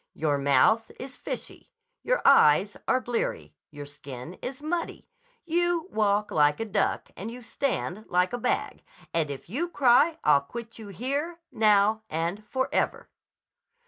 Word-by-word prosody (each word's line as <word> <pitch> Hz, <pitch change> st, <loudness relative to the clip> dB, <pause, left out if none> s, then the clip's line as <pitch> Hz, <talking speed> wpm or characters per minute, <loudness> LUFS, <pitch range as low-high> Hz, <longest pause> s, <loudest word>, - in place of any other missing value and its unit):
"Your 145 Hz, -2 st, 0 dB
mouth 140 Hz, -, +3 dB
is 260 Hz, +1 st, -8 dB
fishy. -, -, -7 dB, 0.3 s
Your -, -, 0 dB
eyes 200 Hz, -, +5 dB
are 255 Hz, -, +3 dB
bleary. 245 Hz, -2 st, -3 dB, 0.2 s
Your 145 Hz, -2 st, -9 dB
skin 140 Hz, 0 st, -9 dB
is 260 Hz, 0 st, -5 dB
muddy. 330 Hz, +3 st, -4 dB, 0.4 s
You 345 Hz, +1 st, 0 dB
walk 210 Hz, -1 st, +1 dB
like 150 Hz, -1 st, +3 dB
a 225 Hz, -, -2 dB
duck, 200 Hz, -2 st, -1 dB
and 210 Hz, -, -6 dB
you 245 Hz, +1 st, -9 dB
stand 220 Hz, -4 st, -3 dB
like 180 Hz, +4 st, +1 dB
a 245 Hz, -, -2 dB
bag. -, -, -1 dB, 0.3 s
And 160 Hz, -3 st, 0 dB
if 140 Hz, -2 st, -7 dB
you 295 Hz, -, -2 dB
cry 290 Hz, +2 st, +4 dB
I'll 145 Hz, -2 st, +5 dB
quit 230 Hz, +10 st, -9 dB
you 220 Hz, -, -9 dB
here, 280 Hz, -, -3 dB
now, 215 Hz, 0 st, +3 dB
and 170 Hz, +6 st, -2 dB
forever." 260 Hz, 0 st, -1 dB
220 Hz, 145 wpm, -27 LUFS, 165-260 Hz, 0.4 s, eyes